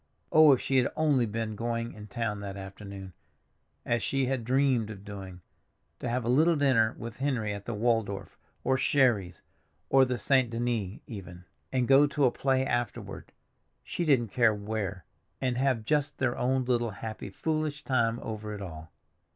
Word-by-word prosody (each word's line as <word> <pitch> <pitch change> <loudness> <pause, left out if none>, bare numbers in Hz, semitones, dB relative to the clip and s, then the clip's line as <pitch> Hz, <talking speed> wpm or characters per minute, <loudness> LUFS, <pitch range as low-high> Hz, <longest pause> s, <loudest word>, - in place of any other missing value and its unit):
Oh, 155 -1 +8
if 130 - +4
she 135 - 0
had 125 - +2
only 145 -6 +2
been 110 0 -3
going 115 +1 -3
in 105 0 -10
town 105 0 -3
that 100 -1 -6
afternoon, 95 -1 -9 0.7
as 120 -1 +1
she 135 +3 0
had 130 -2 -1
dreamed 130 -2 +2
of 100 -2 -9
doing, 95 -3 -8 0.6
to - - -3
have 120 0 -1
a - - -2
little 155 +7 +4
dinner 130 -7 +3
with 115 +1 -8
Henry 125 -7 0
at 100 -1 -7
the 120 - -3
Waldorf, 105 -4 -1 0.3
or 130 0 +2
Sherry's, 120 -11 +2 0.5
or 135 0 +7
the 125 -1 0
St. 130 +1 +3
Denis 115 -4 -2
even—and 95 +5 -5
go 140 +2 +6
to 145 -1 +1
a 125 - +4
play 130 0 +1
afterward—she 120 - -5
didn't 130 -8 +3
care 115 0 +3
where—and 105 - -4
have 130 -4 +1
just 145 +1 0
their 130 -2 0
own 130 +1 0
little 120 -2 +1
happy 110 +1 -6
foolish 155 +5 -2
time 120 -4 +1
over 105 -1 -5
it 100 - -8
all! 80 -3 -9
115 Hz, 165 wpm, -29 LUFS, 105-130 Hz, 0.7 s, Oh